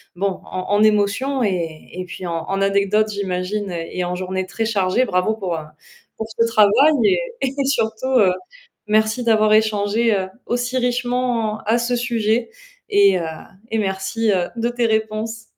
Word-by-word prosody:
bon, 195 +1 -2
en 185 0 -6
en 210 +1 +4
émotions 215 +6 +2
et 170 -6 -3
et 185 +1 -4
puis 180 - -8
en 165 -1 -3
en 195 0 -1
anecdotes, 200 +2 +2
j'imagine 195 0 -3
et 170 +1 -4
en 180 0 -2
journées 185 0 -3
très 225 +3 -2
chargées. 210 +3 +1
Bravo 185 +3 0
pour, 185 -6 -3
heu, - - -3 0.6
pour 220 - -4
ce 230 - +6
travail 225 +8 +5
et 205 - +4 0.2
et 270 +1 -1
surtout, 225 -2 -1
heu, 185 -3 +4 0.5
merci 220 +3 +2
d'avoir 215 -2 +3
échangé, 215 +1 +2
heu, 190 -1 -1 0.2
aussi 245 +1 -1
richement 245 -3 0
à 230 +2 +3
ce 240 +1 0
sujet 235 - 0 0.4
et 400 - +5
heu, 165 - -3 0.4
et 225 - -1
merci, 190 +2 -1
heu, 180 -2 0
de 235 +1 -1
tes 240 -1 0
réponses. 220 +1 -2
215 Hz, 165 wpm, -20 LUFS, 190-235 Hz, 0.6 s, ce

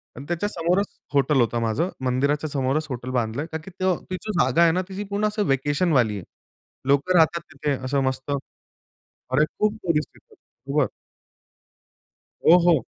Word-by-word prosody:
आणि 135 - -9
त्याच्या 175 +4 -1
समोरच 180 +2 +1 0.3
हॉटेल 140 0 +3
होतं 120 0 +1
माझं. 115 +11 0 0.2
मंदिराच्या 140 +4 +1
समोरच 140 +2 0
हॉटेल 125 0 -5
बांधलंय 120 +3 -1
कारण 160 0 -4
की 190 - -9
ती 185 0 +1 0.2
जी 215 +4 -5
जागा 130 +6 +3
आहे 165 - +5
ना 180 +3 +1
तिची 195 +2 -4
पूर्ण 205 +1 0
असं 210 -1 -1
व्हॅकेशनवाली 135 - +2
आहे. 95 - -7 0.6
लोकं 140 +7 +3
राहतात 165 +1 +4
तिथे 145 +1 -2
असं 135 +1 +1
मस्त 130 +1 -2 0.8
अरे, 135 +4 0
खूप 215 0 +2
टुरिस्ट 165 -4 0
येतात. - - -21 0.3
बरोबर. 140 -1 +1 1.6
हो, 170 - +9
हो. 160 -6 +4
150 Hz, 155 wpm, -24 LUFS, 130-175 Hz, 1.6 s, हो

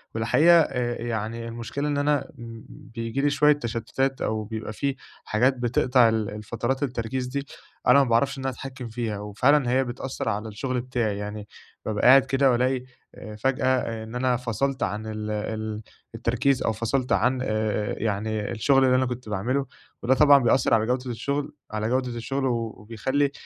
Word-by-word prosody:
والحقيقة، 155 +10 +5
آآ، 120 -5 -2
ي 120 - -4
يعني، 115 +1 -3
المشكلة 120 +5 -4
إن 145 -1 0
أنا 145 -1 +1 0.4
بييجي 115 +3 -5
لي 145 - +3
شوية 150 +1 +4
تَشتُّتات، 130 +1 -2
أو 110 0 -1
بيبقى 110 0 -6
في 140 +4 -2 0.3
حاجات 125 +5 +2
بتقطع 125 0 +3
الفترات 115 +5 -2
التركيز 125 -1 -2
دي، 140 +2 -4 0.4
أنا 140 +3 +7
ما 130 - -3
باعرفش 120 +4 +2
إن 135 - -6
أنا 135 - 0
أتحكَّم 130 0 -8
فيها، 110 -2 -3
وفعلًا 120 +7 +2
هي 130 +1 +3
بتأثِّر 125 -1 -4
على 105 +1 -2
الشغل 125 +4 -3
بتاعي. 120 -5 -2
يعني، 105 0 -6 0.4
بابقى 110 +1 +1
قاعد 135 +1 +8
كده، 135 0 +3
وألاقي 125 +1 +1 0.6
فجأة 130 -4 0
إن 110 +2 -9
أنا 125 0 +1
فصلت 130 +3 -2
عن 105 +1 -3
ال 110 0 -4
ال 110 0 -4 0.3
التركيز، 125 +4 +1
أو - - +1
فصلت 115 +3 -2
عن 125 +6 +2
آآ، 130 - -2
آآ، 110 -1 -1
يعني، 105 0 -2
الشغل 135 +4 +3
اللي 125 -1 +4
أنا 130 0 +3
كنت 125 -2 -5
باعمله. 125 +8 -1 0.4
وده 125 +2 +4
طبعًا 145 +1 +7
بيأثِّر 120 0 +3
على 110 -1 +4
جودة 125 +1 -1
الشغل 140 +5 -3 0.2
على 110 0 -2
جودة 130 +1 0
الشغل 135 +4 -2
وبيخلِّي 115 +4 -1
120 Hz, 170 wpm, -25 LUFS, 110-135 Hz, 0.6 s, قاعد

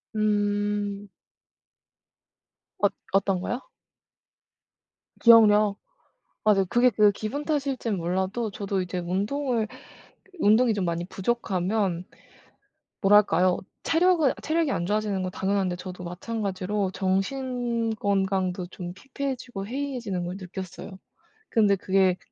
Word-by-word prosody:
음. 205 -1 0 1.7
얻 205 - +2 0.2
어떤거요? 195 +5 0 1.6
기억력. 215 -3 +6 0.7
맞아요. 205 -2 +4
그게 245 +5 +4
그 210 -3 +4
기분 230 +9 -4
탓일지는 275 -8 -1
몰라도 190 +6 -1
저도 200 -1 -2
이제 180 0 -4
운동을 215 +7 -1 0.7
운동이 220 +3 +4
좀 200 -3 -1
많이 170 0 -2
부족하면 190 -3 -1 1.0
뭐랄까요? 195 -3 +4 0.3
체력은 325 -4 +3
체력이 320 -2 +1
안 175 - -1
좋아지는 205 -1 0
건 185 - -3
당연한데 190 -1 -1
저도 185 0 -8
마찬가지로 195 +1 -3
정신 235 +5 -1
건강도 190 -3 0
좀 175 0 -7
피폐해지고 255 -3 -5
해이해지는 240 -8 -3
걸 180 +2 -5
느꼈어요. 190 0 -8 0.5
근데 210 -3 +4
그게 190 -1 +2
205 Hz, 250 characters per minute, -26 LUFS, 185-230 Hz, 1.7 s, 기억력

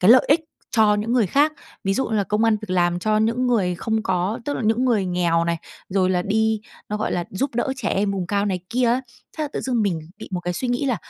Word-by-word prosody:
cái 185 +5 +6
lợi 255 - +8
ích 310 +3 +5 0.4
cho 215 -1 +5
những 215 +3 -1
người 235 -5 +3
khác. 290 - +3 0.3
Ví 195 0 +1
dụ 265 - 0
như 220 - 0
là 200 - +2
công 210 +3 +1
ăn 225 -1 +4
việc 205 - -7
làm 175 -1 +2
cho 215 +3 +1
những 230 +4 +1
người 195 -7 +2
không 220 +5 -1
có 190 +1 0
tức 285 - -2
là - - -3
những 225 +4 +2
người 220 -7 +2
nghèo 170 -2 +1
này, 170 0 0 0.3
rồi 185 -1 +2
là 180 -1 +1
đi 220 +2 +1 0.3
nó 210 - -2
gọi 215 - -2
là 175 - -1
giúp 255 +6 -2
đỡ 265 +3 0
trẻ 220 -5 -2
em 200 +1 +1
vùng 185 -3 -2
cao 200 +1 0
này 185 -2 -1
kia 245 +1 +2
á. 245 +3 +2 0.4
Thế 310 - 0
là - - -3
tự - - -2
dưng 245 -4 0
mình 175 -6 0 0.2
bị - - -9
một 180 - -1
cái 175 +1 -2
suy 245 +8 -3
nghĩ 245 +3 0
là 245 -4 +1
215 Hz, 280 wpm, -22 LUFS, 185-240 Hz, 0.4 s, lợi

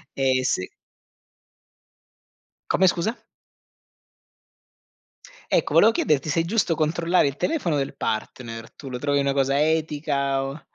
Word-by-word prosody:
Eh 130 -1 +1
s 130 - +1 2.1
Come 190 - +4
scusa? 180 +7 0 2.3
Ecco, - - +1
volevo 225 - +6
chiederti 155 -7 0
se 165 +3 +2
è - - -2
giusto 190 -4 +1
controllare 165 +2 +1
il 140 -1 -1
telefono 185 - -1
del 135 0 -2
partner, 115 +1 -4
tu 140 - -12
lo 125 -1 -5
trovi 145 +1 0
una 140 -1 +1
cosa 135 +1 +1
etica 150 -3 0
o 135 +3 -6
145 Hz, 125 wpm, -24 LUFS, 135-165 Hz, 2.3 s, volevo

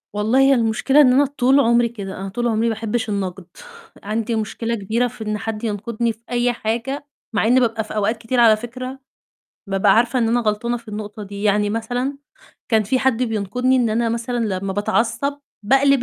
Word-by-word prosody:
والله 220 +5 +2
هي 270 0 +6
المشكلة 240 +4 +3
إن 255 -3 +5
أنا 280 +3 +5
طول 270 0 +2
عمري 235 -2 +3
كده، 200 -4 -7
أنا 195 0 -5
طول 240 +5 -2
عمري 230 0 +1
باحبّش 225 0 -2
النقد، 190 -2 -3 0.6
عندي 225 +3 -2
مشكلة 230 +1 -2
كبيرة 225 +4 0
في 235 -2 -9
إن 215 0 -2
حد 215 +1 -5
ينقدني 230 +2 -2
في 220 - -25
أي 245 0 +1
حاجة. 240 +6 -3 0.3
مع 215 - +1
إني 250 +2 +5
بابقى 230 -3 0
في 215 - -9
أوقات 215 +2 0
كتير 235 +2 -2
على 225 -2 +7
فكرة 255 +3 -7 0.7
بابقى 195 0 +3
عارفة 240 +3 +2
إن 230 -2 +2
أنا 240 +1 +2
غلطانة 230 +2 -1
في 235 -1 -13
النقطة 210 0 -6
دي، 200 0 -7
يعني 210 0 +2
مثلًا 245 +5 -2 0.5
كان 220 -2 +3
في 235 +6 0
حد 255 -2 +1
بينقدني 240 +3 0
إن 240 -3 +2
أنا 230 +2 +1
مثلًا 235 +1 -2 0.2
لمّا 195 0 -3
باتعصّب 230 +7 0 0.3
باقلب 270 +2 +4
230 Hz, 190 wpm, -20 LUFS, 215-245 Hz, 0.7 s, على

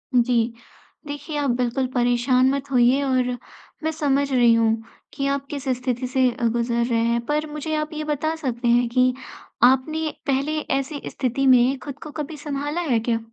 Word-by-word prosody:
जी। 235 -1 +2 0.5
देखिए 290 +1 -5
आप 285 -2 0
बिल्कुल 250 +1 0
परेशान 245 +1 +3
मत 280 0 -3
होइए 250 +2 +4
और 255 -2 +1 0.6
मैं 315 - 0
समझ 285 -3 0
रही 240 -3 +5
हूँ 225 -1 +2 0.3
कि 275 - -2
आप 275 0 -1
किस 280 -2 -5
स्थिति 250 0 -2
से 260 0 +2
अ, 240 +1 -7
गुज़र 235 +1 0
रहे 235 -1 0
हैं। 235 0 +1
पर 300 +2 -1
मुझे 300 +1 -3
आप 305 0 -3
ये 310 0 -4
बता 305 +1 -1
सकते 250 -6 -3
हैं 240 +1 +4
कि 255 +1 +3 0.5
आपने 305 +5 +3 0.2
पहले 280 +3 0 0.2
ऐसी 285 +1 -5
स्थिति 265 +1 -1
में 255 +1 +5
ख़ुद 285 -1 -8
को 305 - -8
कभी 300 +1 -7
संभाला 290 +2 -3
है 260 -9 +1
क्या? 230 0 0
265 Hz, 180 wpm, -23 LUFS, 245-290 Hz, 0.6 s, रही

